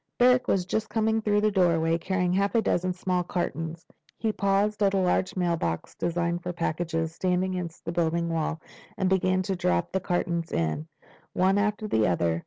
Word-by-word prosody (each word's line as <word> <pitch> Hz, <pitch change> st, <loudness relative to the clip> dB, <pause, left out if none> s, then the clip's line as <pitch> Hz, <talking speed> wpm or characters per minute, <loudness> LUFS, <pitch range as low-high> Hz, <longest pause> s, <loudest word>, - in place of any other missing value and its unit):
Barrack 250 Hz, +1 st, +4 dB
was 185 Hz, -2 st, +1 dB
just 220 Hz, +4 st, -2 dB
coming 220 Hz, 0 st, +1 dB
through 210 Hz, -1 st, +2 dB
the 215 Hz, 0 st, +2 dB
doorway, 165 Hz, -4 st, +3 dB
carrying 180 Hz, 0 st, 0 dB
half 200 Hz, +4 st, +1 dB
a 230 Hz, -, +5 dB
dozen 185 Hz, -1 st, +1 dB
small 180 Hz, 0 st, -1 dB
cartons. 165 Hz, -1 st, -3 dB, 0.3 s
He 220 Hz, -, 0 dB
paused 200 Hz, +1 st, +1 dB
at 200 Hz, -1 st, +3 dB
a -, -, +3 dB
large 185 Hz, 0 st, +1 dB
mailbox 170 Hz, -, -1 dB
designed 170 Hz, 0 st, -1 dB
for 180 Hz, -, -3 dB
packages, 165 Hz, -1 st, -2 dB
standing 185 Hz, +1 st, 0 dB
against 175 Hz, -2 st, -5 dB
the 165 Hz, -, -2 dB
building 170 Hz, 0 st, 0 dB
wall, 165 Hz, -1 st, -1 dB, 0.4 s
and 190 Hz, -, +1 dB
began 185 Hz, 0 st, +2 dB
to 190 Hz, +1 st, -2 dB
drop 90 Hz, -, 0 dB
the 190 Hz, -, 0 dB
cartons 170 Hz, -2 st, -1 dB
in, 85 Hz, -, -1 dB, 0.5 s
one 190 Hz, +2 st, +3 dB
after 210 Hz, +1 st, 0 dB
the 110 Hz, -, +2 dB
other. 85 Hz, -2 st, +1 dB
180 Hz, 185 wpm, -27 LUFS, 165-195 Hz, 0.5 s, a